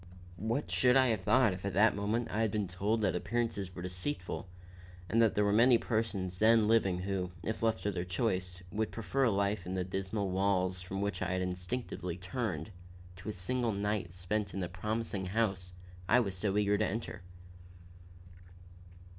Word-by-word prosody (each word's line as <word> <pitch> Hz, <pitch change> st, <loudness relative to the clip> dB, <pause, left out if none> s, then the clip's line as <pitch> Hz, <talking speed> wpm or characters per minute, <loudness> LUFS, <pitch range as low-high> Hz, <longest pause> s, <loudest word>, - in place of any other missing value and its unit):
What 115 Hz, +9 st, -2 dB
should 125 Hz, +1 st, +5 dB
I 130 Hz, -1 st, +5 dB
have 110 Hz, -4 st, 0 dB
thought 120 Hz, +1 st, +4 dB
if 90 Hz, -, -8 dB
at 100 Hz, -3 st, -3 dB
that 105 Hz, +3 st, +5 dB
moment 105 Hz, +4 st, -1 dB
I 110 Hz, -, 0 dB
had 110 Hz, -, +2 dB
been 105 Hz, -1 st, -1 dB
told 100 Hz, +5 st, 0 dB
that 105 Hz, -, +1 dB
appearances 100 Hz, -2 st, -2 dB
were 90 Hz, -, -6 dB
deceitful, 90 Hz, +1 st, -4 dB, 0.6 s
and 115 Hz, +6 st, +3 dB
that 115 Hz, -2 st, +4 dB
there 105 Hz, -, +3 dB
were 100 Hz, -, +2 dB
many 120 Hz, +3 st, +6 dB
persons 100 Hz, -6 st, -2 dB
then 110 Hz, 0 st, +5 dB
living 105 Hz, -5 st, +3 dB
who, 95 Hz, -1 st, -2 dB
if 110 Hz, -, -3 dB
left 115 Hz, -1 st, +1 dB
to 105 Hz, -, +1 dB
their 90 Hz, -2 st, -2 dB
choice, 90 Hz, -1 st, -2 dB
would 110 Hz, -1 st, -1 dB
prefer 115 Hz, +6 st, 0 dB
life 100 Hz, -1 st, 0 dB
in 95 Hz, -, -3 dB
the 90 Hz, -, 0 dB
dismal 95 Hz, +2 st, -2 dB
walls 95 Hz, -1 st, +1 dB
from 95 Hz, +2 st, -4 dB
which 100 Hz, -2 st, -2 dB
I -, -, 0 dB
had 95 Hz, 0 st, 0 dB
instinctively 90 Hz, -1 st, -3 dB
turned, 95 Hz, -, -3 dB, 0.5 s
to 95 Hz, +4 st, -7 dB
a -, -, 0 dB
single 115 Hz, +4 st, 0 dB
night 100 Hz, -3 st, -1 dB
spent 100 Hz, +4 st, -2 dB
in -, -, -2 dB
the 90 Hz, -, -1 dB
promising 100 Hz, +1 st, -2 dB
house 95 Hz, -3 st, -1 dB, 0.4 s
I 125 Hz, -, +6 dB
was 100 Hz, -6 st, -1 dB
so 100 Hz, +2 st, 0 dB
eager 105 Hz, 0 st, +2 dB
to 110 Hz, -, +2 dB
enter. 105 Hz, -2 st, -4 dB
100 Hz, 185 wpm, -32 LUFS, 90-110 Hz, 0.6 s, many